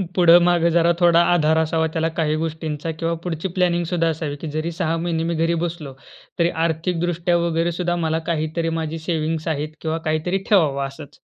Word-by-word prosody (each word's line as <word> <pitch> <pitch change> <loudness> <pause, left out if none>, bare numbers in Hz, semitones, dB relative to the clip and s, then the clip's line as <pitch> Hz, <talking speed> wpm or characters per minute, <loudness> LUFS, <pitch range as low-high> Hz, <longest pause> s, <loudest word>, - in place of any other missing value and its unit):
पुढं 175 -1 +7
मागं 175 -1 +3
जरा 170 0 +4
थोडा 170 -1 +5
आधार 160 -2 +3
असावा 160 0 +1
त्याला, 160 0 0
काही 155 -1 +1
गोष्टींचा 160 0 -4
किंवा 165 0 0
पुढची 170 0 -3
प्लॅनिंग 175 -1 +2
सुद्धा 165 -1 +2
असावी 155 -2 -2
की 165 - -5
जरी 155 +3 -2
6 165 -1 -1
महिने 165 -1 -1
मी - - -1
घरी 165 +1 +1
बसलो, 160 -5 -6 0.5
तरी 170 0 +3 0.2
आर्थिकदृष्ट्या 175 +1 0
वगैरे 170 0 0
सुद्धा 175 0 -1
मला 160 0 0
काहीतरी 160 +1 -1
माझी 160 0 -4
सेव्हिंग्स 160 -1 -2
आहेत 155 -1 -2
किंवा 160 0 -2
काहीतरी 155 +4 0
ठेवावं 145 -9 +3
असंच. 140 +1 -12
165 Hz, 180 wpm, -21 LUFS, 155-170 Hz, 0.5 s, पुढं